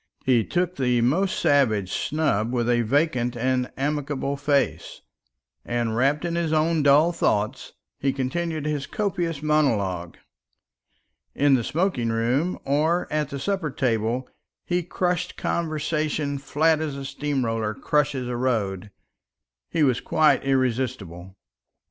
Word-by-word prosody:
He 125 -3 +4
took 180 - -1
the 125 -2 +2
most 175 +11 +1
savage 110 -10 +2
snub 130 -8 0
with 120 -2 0
a 120 -1 +3
vacant 125 -1 0
and 125 +1 0
amicable 140 0 -2
face; 140 - -1 0.6
and, 120 -2 -1
wrapped 140 +6 +1
in 170 - -2
his 170 -2 -1
own 160 +1 +2
dull 145 +4 +5
thoughts, 110 -5 -1 0.3
he 135 - +1
continued 155 +4 -2
his 150 -2 -2
copious 175 -8 -2
monologue. 100 - 0 1.2
In 145 -1 +3
the 125 -3 +3
smoking 155 - 0
room 125 +10 0
or 155 +5 +1
at 150 -2 0
the 140 - -5
supper 185 +2 -1
table 120 -1 -1 0.4
he 175 0 0
crushed 180 +1 -2
conversation 155 -3 -1
flat 155 +3 +1
as 150 -3 -3
a 135 - -6
steam 140 -1 -2
roller 110 -2 -2
crushes 145 -4 0
a 125 - -3
road. 105 -6 -1 0.8
He 160 - +1
was 130 -4 +2
quite 155 -1 +3
irresistible. 125 -9 -1
140 Hz, 130 wpm, -24 LUFS, 120-155 Hz, 1.2 s, dull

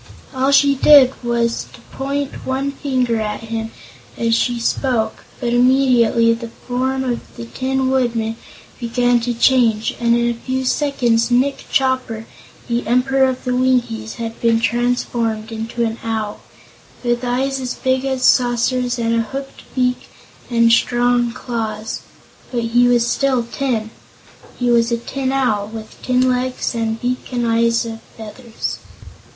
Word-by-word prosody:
All 265 +1 +1
she 280 0 +5
did 275 -1 +7
was 235 -1 0
to - - -14
point 280 +1 -3
one 270 +2 -1
finger 255 -4 -1
at 210 0 -3
him 225 0 -4 0.5
as 230 -1 +1
she 240 +1 +1
spoke, 230 -2 -1 0.2
but 240 -2 -1
immediately 245 -2 +4
the 230 0 -6
form 260 +3 -2
of 245 -2 -1 0.2
the 115 - -6
Tin 260 - -1
Woodman 235 -4 0 0.4
began 245 0 +2
to 240 +1 -2
change 230 -2 +2
and 235 0 +3
in 235 0 +1
a 240 - +1
few 260 +2 -3
seconds 245 -5 +1
Nick 255 +3 +1
Chopper, 255 -4 0 0.4
the 235 -2 -1
Emperor 265 +2 +3
of 255 - -5
the 250 -1 -1
Winkies, 245 -4 0
had 230 -1 -6
been 230 -1 +3
transformed 230 -1 -1
into 225 +1 -2
an 225 0 -3
Owl, 220 -2 -3 0.6
with 240 0 0
eyes 265 +2 -1
as 255 -1 -4
big 260 0 0
as 265 -1 -2
saucers 245 0 +2
and 230 -1 0
a 230 - +2
hooked 270 +5 -7
beak 250 -1 0 0.4
and 230 -1 +4
strong 240 0 +2
claws. 225 -2 -4 0.5
But 240 -2 -1
he 240 +2 +3
was 240 -1 +3
still 260 0 +1
tin. 230 -2 -2 0.7
He 245 -1 +1
was 235 0 +3
a 235 - +2
Tin 260 +3 -3
Owl, 235 -7 +1
with 220 0 -10
tin 255 0 +2
legs 255 0 -1
and 225 -1 -2
beak 250 +2 -3
and 240 -1 -1
eyes 230 0 +2
and 225 -1 -7 0.2
feathers. 225 +1 -6
240 Hz, 150 wpm, -19 LUFS, 230-260 Hz, 0.7 s, did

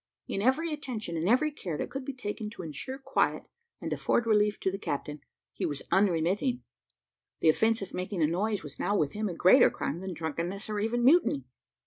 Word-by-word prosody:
In 195 - -2
every 300 +8 +2
attention 240 - -5
and 165 +4 0
every 300 +6 +3
care 175 - -5
that - - -4
could 270 0 -4
be 275 - -5
taken 210 -3 -4
to - - -7
insure 170 - -6
quiet, 270 - 0 0.4
and - - -3
afford 235 - +1
relief 210 -2 +3
to 190 - +1
the 195 - -5
captain, 150 -3 -4 0.3
he - - -5
was 145 -2 -2
unremitting; 195 - +2 0.8
the 160 - +4
offence 220 +6 +3
of 195 - -9
making 185 -1 -2
a - - +6
noise 200 +6 0
was 145 -2 -9
now, 205 - +1
with 145 -5 0
him, 215 0 -2
a 175 - -5
greater 190 +10 +7
crime 155 - -3
than 190 0 -5
drunkenness, 170 +6 -3
or 210 - -1
even 235 +3 0
mutiny. 270 - +4
205 Hz, 200 wpm, -29 LUFS, 170-240 Hz, 0.8 s, greater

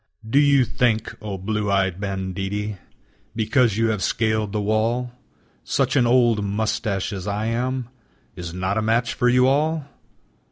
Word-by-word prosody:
Do 135 +6 +3
you 140 -3 +5
think, 115 -3 0
o 105 -2 -5
blue 105 +2 -2
eyed 95 -1 +1
banditti, 100 +1 -3 0.6
Because 115 0 +2
you 115 0 +2
have 105 -3 -1
scaled 110 +1 0
the 105 - -1
wall, 115 +4 0 0.5
Such 135 0 0
an 125 -4 +4
old 120 -3 +3
mustache 100 -1 -1
as 95 0 -6
I 105 +1 -2
am 125 +2 -1 0.5
Is 85 -1 -6
not 95 +4 -1
a - - 0
match 115 +2 +1
for 125 - +2
you 125 +1 +4
all! 150 +3 +1
110 Hz, 155 wpm, -22 LUFS, 100-125 Hz, 0.6 s, you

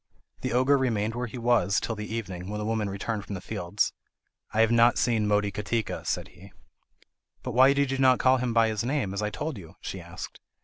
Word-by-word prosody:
The - - -3
ogre 130 +3 +4
remained 115 -4 0
where 120 +1 -3
he 115 - -8
was, 115 -6 +2
till 115 - -3
the 105 0 -6
evening, 95 -5 -5
when 105 - -3
the 105 - -3
woman 110 -2 -1
returned 100 +2 -3
from 100 - -6
the - - -5
fields. 100 +1 -2 0.6
"I 110 - +2
have 115 0 +4
not 120 +1 +5
seen 115 -3 +2
Motikatika," 105 +1 -1
said - - -2
he. - - -15 0.9
"But 125 - -3
why 130 +3 +6
did 140 -1 +1
you 135 - -1
not 130 -1 +5
call 130 0 +4
him 125 -1 -1
by 115 -1 +4
his 110 -1 -2
name, 125 -6 -1
as 100 - -2
I 105 - 0
told 150 0 -4
you?" 85 -1 -13
she 95 - -6
asked. 85 0 -9
110 Hz, 220 wpm, -27 LUFS, 100-125 Hz, 0.9 s, why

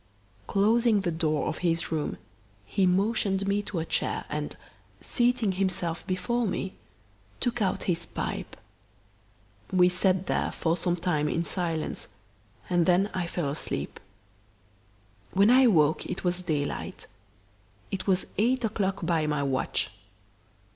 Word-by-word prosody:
Closing 220 +1 +3
the 175 -3 -1
door 155 -2 0
of - - -3
his 170 -2 0
room, 155 -2 -1 0.5
he 190 - +2
motioned 195 +1 +1
me 200 +1 +2
to 205 -2 -5
a 165 - -1
chair - - -1
and, - - -3 0.4
seating 240 -4 +1
himself 185 -3 -2
before 230 +6 0
me, 190 0 -2 0.7
took 240 -1 -1
out 190 -2 0
his 170 -2 -1
pipe. - - -4 1.1
We 180 -1 +5
sat 185 +1 +2
there - - 0
for 165 0 +1
some 175 0 0
time 165 -4 0
in 170 +2 0
silence 165 -4 -2 0.6
and 175 -1 +2
then 185 +3 +3
I 180 -2 -1
fell 170 -4 -2
asleep. 150 - -4 1.3
When 200 +4 +5
I 260 +1 +7
awoke 155 -9 +4
it 180 - -4
was 180 0 0
daylight. 150 -5 -3 0.9
It 195 - -4
was 190 -1 +2
eight 245 +3 +2
o'clock 200 -4 -1
by 160 -2 +1
my 150 -1 0
watch. 135 -2 -1
185 Hz, 135 wpm, -28 LUFS, 165-200 Hz, 1.3 s, I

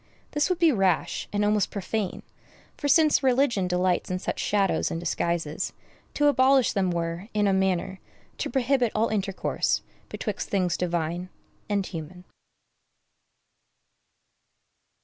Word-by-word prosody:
This 295 +3 +1
would 365 - +1
be 335 -2 +5
rash, 190 - 0
and 205 0 +1
almost 210 -1 +2
profane; 200 0 -3 0.5
for, 290 - -3
since 305 +1 +5
religion 250 -7 +2
delights 180 0 0
in 185 - -1
such 185 - -4
shadows 200 -2 +1
and 165 - -3
disguises, 170 -2 -2 0.4
to 295 - +2
abolish 270 -2 +4
them 195 -3 +1
were, 170 +2 -3
in 210 -1 +2
a 195 - +3
manner, 190 0 0 0.4
to - - -2
prohibit 255 -3 +1
all 220 +2 +2
intercourse 195 -3 -1 0.3
betwixt - - -4
things 180 -4 +1
divine 175 0 -2 0.4
and 200 -2 0
human. 180 +1 -8
195 Hz, 130 wpm, -26 LUFS, 180-240 Hz, 0.5 s, be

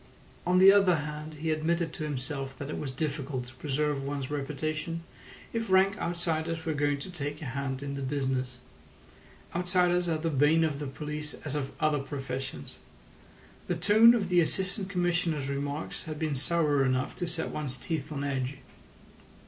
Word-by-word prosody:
On 180 0 +4
the 190 +1 +10
other 195 -3 +5
hand, 150 +1 -5
he 160 +2 -1
admitted 165 +1 0
to - - -5
himself 135 -2 -4
that 140 +2 -5
it - - -3
was 145 - -3
difficult 135 -2 -2
to 125 - -12
preserve 145 +1 -1
one's 140 -1 -3
reputation 155 +3 -2 0.5
if 230 -2 -2
rank 190 +1 +5
outsiders 165 -1 -1
were 160 - 0
going 145 -1 +1
to 185 - -7
take 145 -3 -4
a - - -6
hand 135 0 -3
in 140 0 -3
the 140 - -4
business. 130 -2 -1 1.0
Outsiders 180 0 +3
are 160 - +1
the 165 +1 -1
bane 150 +3 +4
of 150 -3 0
the 145 - -3
police 150 +2 -5
as 145 - -3
of 140 -2 -2
other 155 -1 +2
professions. 135 - -5 0.9
The 175 - 0
tone 215 +7 +7
of 200 -5 -1
the 180 -1 +5
Assistant 190 +4 -1
Commissioner's 175 -6 0
remarks 140 +2 -3
had 155 -1 -5
been 155 -1 -1
sour 145 0 +2
enough 130 0 0
to 175 - -2
set 160 -1 -3
one's 140 -4 -3
teeth 155 -1 -3
on 140 -2 -3
edge. 135 -1 -2
150 Hz, 175 wpm, -29 LUFS, 140-170 Hz, 1.0 s, the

